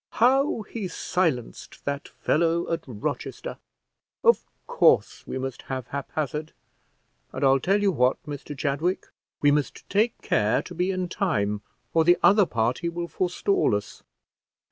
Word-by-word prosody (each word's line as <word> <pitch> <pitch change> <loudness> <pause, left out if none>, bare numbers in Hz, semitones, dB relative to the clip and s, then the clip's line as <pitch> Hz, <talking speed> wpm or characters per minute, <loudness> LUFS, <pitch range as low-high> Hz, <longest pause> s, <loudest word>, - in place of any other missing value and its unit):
"How 260 0 +3
he 210 -2 -5
silenced 165 -9 -2
that 140 0 -3
fellow 170 +1 0
at 165 - -3
Rochester. 145 - -5 0.6
Of 470 - +4 0.2
course - - +3
we - - -3
must 130 -1 -4
have 130 -2 -4
Haphazard; 150 +2 -4 0.8
and 130 - -4
I'll 135 0 +5
tell 195 +8 +2
you 205 -1 +3
what, 125 -5 +2
Mr 145 -1 -7
Chadwick, 155 +7 -1 0.3
we 145 - +6
must 145 -1 -1
take 215 +4 +2
care 105 +1 +2
to 180 - -9
be 180 +2 0
in 185 -1 -1
time, 105 - 0 0.3
or 165 - +4
the 175 +2 +5
other 205 -2 +6
party 120 +9 0
will 170 0 -4
forestall 180 - +1
us." 105 0 -5
160 Hz, 145 wpm, -26 LUFS, 135-185 Hz, 0.8 s, we